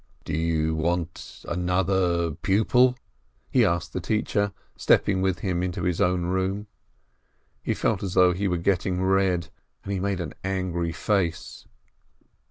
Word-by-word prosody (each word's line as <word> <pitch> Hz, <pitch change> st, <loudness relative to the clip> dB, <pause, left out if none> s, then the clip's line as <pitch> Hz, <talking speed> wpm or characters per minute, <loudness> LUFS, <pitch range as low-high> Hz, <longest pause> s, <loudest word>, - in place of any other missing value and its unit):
"Do -, -, -4 dB
you 80 Hz, 0 st, 0 dB
want 85 Hz, +1 st, -3 dB
another 90 Hz, -1 st, +1 dB
pupil?" 110 Hz, -, +3 dB, 0.5 s
he -, -, +4 dB
asked 85 Hz, 0 st, 0 dB
the 95 Hz, -, -2 dB
teacher, 100 Hz, +1 st, 0 dB, 0.2 s
stepping 95 Hz, -2 st, +2 dB
with 95 Hz, -1 st, 0 dB
him 90 Hz, -3 st, -1 dB
into 90 Hz, +2 st, -3 dB
his 90 Hz, -2 st, 0 dB
own 90 Hz, 0 st, +2 dB
room. 95 Hz, +3 st, -1 dB, 1.0 s
He -, -, -1 dB
felt -, -, 0 dB
as 95 Hz, -2 st, -4 dB
though 90 Hz, -1 st, +6 dB
he 100 Hz, +3 st, -1 dB
were 90 Hz, -2 st, 0 dB
getting 90 Hz, +1 st, 0 dB
red, 95 Hz, -3 st, +2 dB, 0.3 s
and 100 Hz, -, -3 dB
he 95 Hz, -, -1 dB
made 100 Hz, 0 st, -1 dB
a 85 Hz, -, -2 dB
very 75 Hz, -, -10 dB
angry 90 Hz, -3 st, -1 dB
face. 85 Hz, 0 st, -2 dB
90 Hz, 150 wpm, -25 LUFS, 85-95 Hz, 1.0 s, though